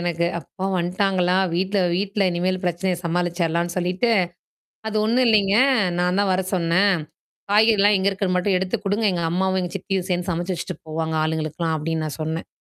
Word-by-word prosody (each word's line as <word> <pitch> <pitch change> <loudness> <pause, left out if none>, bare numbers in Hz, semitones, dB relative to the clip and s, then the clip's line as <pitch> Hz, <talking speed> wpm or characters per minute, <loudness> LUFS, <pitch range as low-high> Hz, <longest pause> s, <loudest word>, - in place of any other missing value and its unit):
எனக்கு. 170 -1 -1
அப்பா 185 +3 -8
வந்துட்டாங்களா 180 0 +1 0.2
வீட்ல 190 +4 0 0.2
வீட்ல 200 +2 -1
இனிமேல் 180 +2 -1
பிரச்சனைய 180 +1 -1
சமாளிச்சரலான்னு 170 0 -1
சொல்லிட்டு 180 +6 0 0.8
அது 220 0 -2
ஒண்ணும் 240 +4 +2
இல்லீங்க. 200 -3 +3 0.4
நான் 180 +2 +1
தான் 200 -2 +1
வர 185 +1 +1
சொன்னேன். 185 +3 +2 0.6
காய்கறிலாம் 210 -1 +4
எங்க 190 +1 +1
இருக்கறது 190 -1 -1
மட்டும் 185 +1 +1
எடுத்து 190 +4 -1
குடுங்க. 205 +3 0
எங்க 175 -1 -2
அம்மாவும், 190 +2 0
எங்க 180 -1 -3
சித்தியும் 190 -1 -3
சேர்ந்து 180 +1 -1
சமைச்சு 175 +2 -2
வச்சுட்டு 175 +1 -5
போவாங்க, 160 0 -2
ஆளுங்களுக்கெல்லாம் 160 +1 -2
அப்படின்னு 160 +1 -2
நான் 155 - -6
சொன்னேன். 160 +1 -3
180 Hz, 160 wpm, -22 LUFS, 170-195 Hz, 0.8 s, காய்கறிலாம்